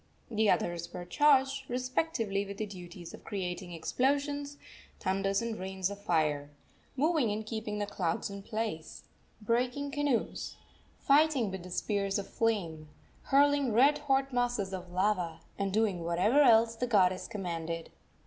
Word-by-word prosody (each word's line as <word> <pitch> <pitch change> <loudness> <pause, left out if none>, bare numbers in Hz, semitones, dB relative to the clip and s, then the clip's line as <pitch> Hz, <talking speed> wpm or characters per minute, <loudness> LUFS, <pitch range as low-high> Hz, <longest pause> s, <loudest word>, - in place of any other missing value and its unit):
The 215 -1 +2
others 170 -2 0
were 175 - -6
charged, 270 +3 +3
respectively, 250 -5 -1
with 200 0 -8
the 215 - -2
duties 175 -3 -10
of - - -11
creating 180 -3 -4
explosions, 285 - -1 0.4
thunders 195 +2 0
and 230 -1 -3
rains 190 0 -2
of 200 0 -8
fire, 155 -7 +1 0.5
moving 300 -3 +2
and 215 +1 -3
keeping 220 -1 -4
the 205 - -1
clouds 180 -5 -2
in 200 0 -7
place, 215 -6 -4 0.4
breaking 250 +6 0
canoes, 285 -5 -1 0.4
fighting 280 -6 +3
with 185 -1 -7
spears 200 +1 0
of 200 -1 -4
flame, 170 -9 -1 0.4
hurling 285 -3 +3
red 275 +6 +5
hot 270 -2 +1
masses 240 -6 0
of 180 -1 -6
lava, 180 -3 0 0.2
and 200 -1 0
doing 200 -4 +1
whatever 180 - +3
else 230 -3 +5
the 250 +2 -2
goddess 185 -5 +3
commanded. 170 -5 -4
210 Hz, 140 wpm, -31 LUFS, 185-255 Hz, 0.5 s, red